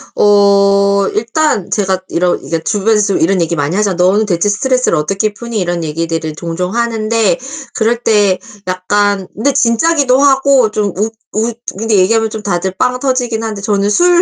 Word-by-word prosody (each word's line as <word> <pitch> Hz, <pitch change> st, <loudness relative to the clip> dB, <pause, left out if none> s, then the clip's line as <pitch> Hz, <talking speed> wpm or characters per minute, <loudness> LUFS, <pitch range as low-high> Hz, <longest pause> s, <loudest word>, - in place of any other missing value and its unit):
어 200 Hz, -1 st, +3 dB
일단 230 Hz, -, -1 dB
제가 190 Hz, -3 st, 0 dB
이러 175 Hz, +1 st, 0 dB
그니까 165 Hz, -, -4 dB
주변에서 210 Hz, +4 st, +1 dB
좀 200 Hz, -, 0 dB
이런 185 Hz, +2 st, +1 dB
얘기 170 Hz, 0 st, -1 dB
많이 145 Hz, +3 st, -1 dB
하잖아. 200 Hz, -2 st, 0 dB
"너는 185 Hz, +5 st, +2 dB
대체 185 Hz, 0 st, 0 dB
스트레스를 255 Hz, +5 st, +1 dB
어떻게 195 Hz, +8 st, -1 dB
푸니." 235 Hz, 0 st, -5 dB
이런 175 Hz, -2 st, -2 dB
얘기들을 160 Hz, 0 st, -3 dB
종종 180 Hz, +4 st, -4 dB
하는데 230 Hz, 0 st, 0 dB, 0.4 s
그럴 230 Hz, +2 st, +1 dB
때 205 Hz, -4 st, +2 dB, 0.3 s
약간 195 Hz, +1 st, 0 dB
근데 275 Hz, +7 st, 0 dB
진짜기도 265 Hz, +2 st, +2 dB
하고 270 Hz, -4 st, +3 dB
좀 210 Hz, -3 st, -1 dB
웃 215 Hz, +3 st, -1 dB, 0.2 s
웃 225 Hz, +2 st, -2 dB, 0.2 s
근데 225 Hz, +1 st, 0 dB
얘기하면 220 Hz, +4 st, +2 dB
좀 215 Hz, -1 st, -7 dB
다들 190 Hz, -1 st, -2 dB
빵 250 Hz, +3 st, 0 dB
터지긴 250 Hz, -4 st, -1 dB
한데 215 Hz, -3 st, -4 dB
저는 200 Hz, 0 st, 0 dB
술 350 Hz, +10 st, +4 dB
205 Hz, 350 characters per minute, -13 LUFS, 185-230 Hz, 0.4 s, 술